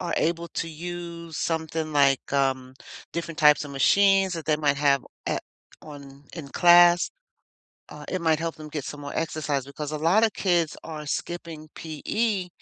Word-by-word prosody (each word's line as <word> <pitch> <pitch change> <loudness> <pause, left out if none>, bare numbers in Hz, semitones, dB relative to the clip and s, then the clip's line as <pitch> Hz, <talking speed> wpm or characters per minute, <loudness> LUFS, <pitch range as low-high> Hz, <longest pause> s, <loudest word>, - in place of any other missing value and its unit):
are 175 -2 -2
able 170 +1 0
to 165 - -4
use 170 0 -7
something, 160 -1 -2
like, 140 -3 +2
um, 130 -2 0 0.4
different 165 -1 -5
types 150 0 +5
of 145 - -8
machines 195 +7 +4
that 165 -2 -5
they 155 -1 +2
might 145 -2 +1
have 140 -2 +2 0.2
at - - -1 0.4
on 140 -2 -12
in 160 -5 -8
class, 175 +2 +6 0.8
uh, - - -10
it 185 - -3
might 160 -2 +2
help 165 0 -3
them 155 -1 -10
get 150 -2 -5
some 145 0 -7
more 140 0 -7
exercise, 155 -4 -2
because 145 +1 -6
a 155 - -2
lot 170 +8 +3
of 220 - -1
kids 175 -5 0
are 155 -2 -7
skipping 160 +1 -5
PE 185 +5 -2
160 Hz, 170 wpm, -25 LUFS, 145-170 Hz, 0.8 s, class